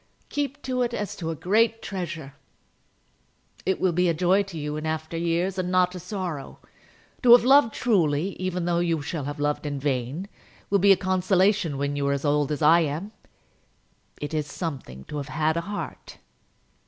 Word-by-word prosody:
"Keep 290 -1 -3
to 255 -1 -1
it 240 -1 0
as 205 - -4
to 165 -3 -4
a 165 - -2
great 225 +7 +2
treasure. 170 -7 -5 1.3
It 190 - +1
will 185 - +2
be 180 +1 +2
a 165 - +1
joy 185 +4 +3
to 195 -4 -7
you 150 0 -3
in 155 +1 -4
after 160 +1 -3
years, 170 +3 0
and 180 -1 -1
not 180 0 +3
a 180 - -6
sorrow. 180 -6 -5 0.6
To 240 -2 +8
have 240 - +8
loved 270 -2 +6
truly, 175 -7 +2
even 180 -1 -2
though 170 -1 +1
you 165 -3 0
shall 155 -2 -4
have 145 +1 -5
loved 145 0 0
in 145 -1 -3
vain, 135 +6 -2 0.4
will 200 - +4
be 200 +1 +6
a 195 - +6
consolation 185 -2 +2
when 140 +1 -1
you 140 -1 -1
are 140 - +2
as 140 +1 -3
old 145 0 +2
as 150 +1 -2
I 165 +3 +7
am. 165 +6 -2 1.1
It 145 +1 -5
is 150 -2 -1
something 135 - -6
to 150 - -7
have 145 0 -5
had 155 +1 0
a 170 - 0
heart." 205 - -6
170 Hz, 190 wpm, -25 LUFS, 150-195 Hz, 1.3 s, To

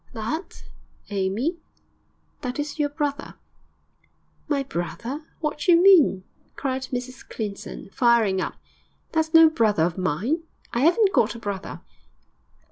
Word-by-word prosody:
'That, 250 - -5 0.5
Amy? 205 - -1 0.8
That 250 -3 -4
is 295 +1 -4
your 290 -1 +2
brother!' 290 0 -3 1.1
'My 280 -2 0
brother? 240 - -5
What 300 -1 -2
d'you 335 +3 +5
mean?' 345 - +6 0.3
cried 265 -1 -2
Mrs 250 0 -5
Clinton, 205 -2 -6
firing 235 -7 +3
up. - - -4 0.6
'That's 320 0 0
no 325 0 +9
brother 220 - +2
of 170 +2 -1
mine. 205 - 0 0.3
I 255 +6 +3
'aven't 390 +2 +3
got 235 - +2
a - - -8
brother.' 200 -3 -5
260 Hz, 125 wpm, -24 LUFS, 210-310 Hz, 1.1 s, no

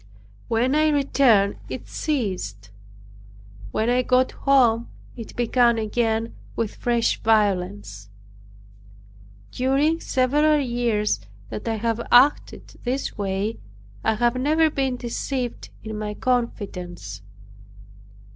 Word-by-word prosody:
When 235 +4 +1
I 310 +1 +3
returned 265 -8 +3
it - - -6
ceased. 185 - -3 1.0
When 220 - -1
I 245 +1 +3
got 255 +1 +2
home 240 -4 +3 0.3
it 230 -3 -9
began 240 0 +3
again 225 +1 -1 0.2
with 225 -3 -2
fresh 235 -1 0
violence. 180 - 0 1.4
During 275 +6 +1
several 295 +4 +2
years 235 - 0 0.3
that 110 - -6
I 225 - 0
have 230 +1 -1
acted 260 +4 +3
this 255 +3 -2
way, 200 +2 -2 0.4
I 220 - +2
have 240 +2 +2
never 310 +4 +2
been 265 -3 -1
deceived 245 +1 -4
in 220 -1 -5
my 210 -1 -4
confidence. 180 - -3
235 Hz, 105 wpm, -23 LUFS, 210-260 Hz, 1.4 s, I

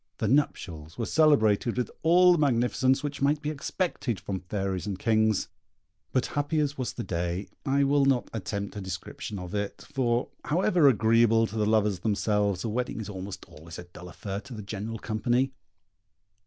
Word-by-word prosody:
The 110 - -1
nuptials 85 - -1
were 115 - -1
celebrated 120 -8 +3
with 125 - -1
all 180 +2 +6
the 175 - +3
magnificence 130 0 +2
which 145 -2 -4
might 145 +2 +3
be 150 +1 -3
expected 145 - -2
from 95 -2 -4
fairies 95 0 -3
and 100 -3 -3
kings; 110 -1 +2 0.6
but 130 - +1
happy 145 +2 -1
as 145 -1 0
was 130 -3 -3
the 120 - -5
day, 90 +1 -3 0.2
I 140 +1 +3
will 140 0 +3
not 135 -3 +2
attempt 100 -2 -4
a 105 - -5
description 95 +2 -6
of 90 0 -7
it, 100 -1 -3
for, 120 -2 +1 0.2
however 175 -1 +3
agreeable 115 -1 +4
to 110 - -7
the 105 -1 +1
lovers 105 -3 +2
themselves, 105 -3 0
a - - -2
wedding 125 +2 -2
is 110 - -5
almost 95 0 -7
always 80 +2 -11
a - - -7
dull 90 0 -12
affair 100 +2 -5
to 125 - -10
the 105 - -7
general 105 +2 -5
company. 120 +5 0
110 Hz, 180 wpm, -27 LUFS, 100-135 Hz, 0.6 s, all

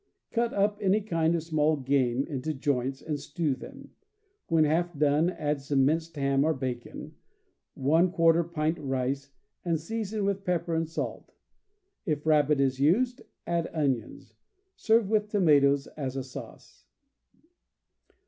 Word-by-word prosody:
Cut 235 0 0
up 205 +1 +1
any 200 +1 +3
kind 165 -5 0
of 165 - -2
small 155 -1 +1
game 130 -1 +1
into 150 +2 -4
joints, 135 -1 -1
and 150 -2 -3
stew 150 +1 -2
them. 130 - -11 0.6
When 165 -2 +3
half 165 +2 0
done, 150 +3 +3
add 150 -5 -2
some 135 -1 +2
minced 160 +3 0
ham 140 -1 +1
or 160 +1 +1
bacon, 130 -2 -6 0.6
j 165 +3 +3
pint 155 0 -1
rice, 135 0 -2 0.3
and 165 -3 0
season 215 +3 -3
with 195 0 -1
pepper 170 -2 -1
and 160 -1 -1
salt. 165 - -5 0.7
If 150 -6 -2
rabbit 150 -2 +3
is 135 -1 +1
used, 240 - +2 0.2
add 170 -1 -1
onions. 135 -7 -2 0.4
Serve 225 -1 +2
with 210 0 +1
toma 170 -9 +4
toes 140 0 +2
as 135 -3 -4
a 135 - -2
sauce. 130 - -11
155 Hz, 140 wpm, -28 LUFS, 140-175 Hz, 0.7 s, toma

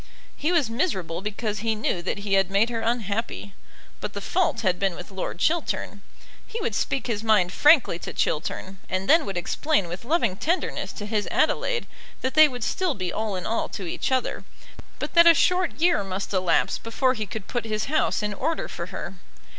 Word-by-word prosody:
He 310 - 0
was 330 -8 +3
miserable 190 - -2
because 210 0 -3
he 225 +1 0
knew 210 -4 -1
that 180 - -2
he 200 -1 -3
had 195 -1 +3
made 205 +5 +2
her 230 - -2
unhappy; 225 -3 -2 0.5
but - - -5
the - - -4
fault 370 -1 0
had 185 -4 +1
been 195 -3 0
with 180 - -9
Lord 190 -3 -4
Chiltern. 300 - -1 0.5
He 460 - -5
would 235 - -2
speak 265 +5 -1
his 225 -3 -2
mind 205 -5 +3
frankly 290 - +5
to - - -6
Chiltern, 185 +4 -2
and 185 +1 -2
then 320 -6 +5
would 195 -2 -3
explain 200 - 0
with 175 +5 -6
loving 235 - +1
tenderness 340 - -1
to 205 - -6
his 210 -1 -1
Adelaide - - +1 0.4
that 260 - -1
they 310 +1 +8
would 250 -4 -6
still 360 - 0
be 185 -3 -3
all 215 -2 -2
in 185 - -5
all 225 - -1
to 195 - -6
each 170 - -2
other, 260 -1 0 0.5
but - - -5
that 340 0 +7
a 335 - +9
short 360 -1 +2
year 340 - +3
must 195 +1 -4
elapse 185 -2 +2
before 255 +3 +1
he 215 -4 -4
could 215 0 -6
put 240 -2 -3
his 215 -1 -1
house 310 -6 +1
in 210 0 -1
order 325 +11 -2
for - - -6
her. - - -6
220 Hz, 200 wpm, -25 LUFS, 195-280 Hz, 0.5 s, a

